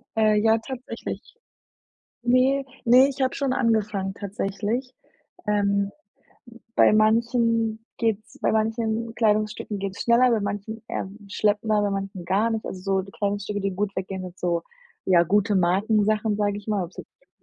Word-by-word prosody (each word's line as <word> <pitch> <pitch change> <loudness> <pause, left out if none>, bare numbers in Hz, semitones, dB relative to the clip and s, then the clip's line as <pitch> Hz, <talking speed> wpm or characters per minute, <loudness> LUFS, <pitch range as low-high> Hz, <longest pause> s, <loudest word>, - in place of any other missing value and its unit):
Äh, 215 -1 +4
ja 220 +1 +4
tatsächlich. 255 +2 -6 1.1
Ne, 260 +3 +3 0.2
ne, 255 +3 +7
ich 275 0 -5
habe 260 0 +1
schon 275 -2 0
angefangen 215 -6 0
tatsächlich. 205 +5 -3 0.5
Ähm, 200 -1 +1 0.6
n 235 -1 -14 0.2
bei - - +6
manchen 225 0 +2
geht's 220 -2 -2
bei - - +2
manchen 225 +1 -1
Kleidungsstücken 215 -2 0
geht's 195 0 -5
schneller, 240 +2 +4
bei 230 -2 +2
manchen 205 +2 -4
eher - - -3 0.2
schleppender, 210 +1 +1
bei 205 - +1
manchen 195 -2 -4
gar 200 +6 +2
nicht. 220 -1 -2
Also, 185 - -6
so 190 0 0
die 195 - -12
Kleidungsstücke, 205 -1 -2
gut 200 +1 -2
weggehen 190 0 -4
sind 180 0 -9
so, 170 -1 0 0.4
ja, 180 -3 +5
gute 205 +4 +2
Markensachen, 210 +3 +2
sage 205 -1 0
ich 205 - -9
mal, 210 -3 0
ob 170 - -9
es - - -23
jetzt - - -15
210 Hz, 155 wpm, -24 LUFS, 200-230 Hz, 1.1 s, ne